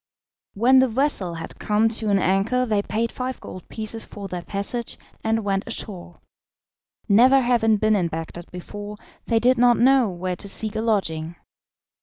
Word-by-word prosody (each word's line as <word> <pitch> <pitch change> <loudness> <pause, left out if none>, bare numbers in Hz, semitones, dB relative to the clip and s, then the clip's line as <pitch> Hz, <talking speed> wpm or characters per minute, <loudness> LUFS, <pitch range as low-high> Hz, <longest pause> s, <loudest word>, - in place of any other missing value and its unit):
When 250 +6 +5
the 260 - +4
vessel 225 - -1
had 165 0 -7
come 210 +1 +2
to 220 -1 -1
an 200 - +3
anchor 195 +7 +1
they 210 -4 +1
paid 225 +3 -2
five 255 0 -4
gold 185 - -10
pieces 220 0 -5
for 200 -1 -8
their 180 -1 -5
passage 205 +6 -4 0.3
and 225 0 0
went 195 0 -1
ashore. 180 -4 -5 0.9
Never 250 +6 +6
having 235 -4 +2
been 215 +1 +2
in 180 -4 +1
Bagdad 165 +1 -7
before, 205 +3 -8 0.3
they 230 - +2
did 245 +2 +3
not 245 -1 +5
know 260 -2 +4
where 180 0 -4
to 200 - -4
seek 215 +2 +1
a 220 - -1
lodging. 170 -7 -1
215 Hz, 170 wpm, -23 LUFS, 195-235 Hz, 0.9 s, Never